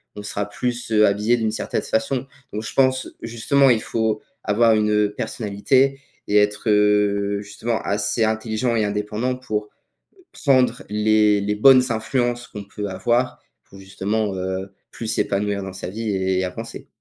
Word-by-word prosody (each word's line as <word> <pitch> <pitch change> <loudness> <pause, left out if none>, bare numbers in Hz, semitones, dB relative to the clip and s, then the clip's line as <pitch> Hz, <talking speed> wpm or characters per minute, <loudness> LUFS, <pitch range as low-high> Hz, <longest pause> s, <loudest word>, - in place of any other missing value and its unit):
on 105 - -7
sera 105 0 -3
plus, 120 +1 -3
heu, 105 -1 +5
habillé 105 +4 +2
d'une 110 -1 0
certaine 110 - -2
façon. 120 +4 -1 0.3
Donc 105 +1 -4
je - - -6
pense, 130 -1 +2
justement, 130 +4 +2
il 115 -3 +3
faut 110 -1 -1 0.2
avoir 115 +2 +3
une, 105 0 +2
heu, 105 -1 +2
personnalité 130 +8 0 0.3
et 105 - +3
être, 105 +1 +1
heu, 105 -1 +2
justement 110 +3 -3
assez 105 +2 0
intelligent 110 +2 0
et 110 -2 +2
indépendant 105 +5 -2
pour 105 -4 -4 0.6
prendre 130 -3 +2
les 105 0 +3
les 105 +1 -1
bonnes 130 +3 +7
influences 120 +2 -1
qu'on 105 -1 -8
peut 105 +1 -6
avoir, 120 +7 0 0.2
pour 95 - -16
justement, 100 +2 -2
heu, 95 +1 -4 0.2
plus 115 - -7
s'épanouir 100 -1 -1
dans 95 - -6
sa 95 -1 -6
vie 110 +3 -4
et 95 -1 0
avancer. 115 +6 -7
105 Hz, 160 wpm, -22 LUFS, 100-115 Hz, 0.6 s, bonnes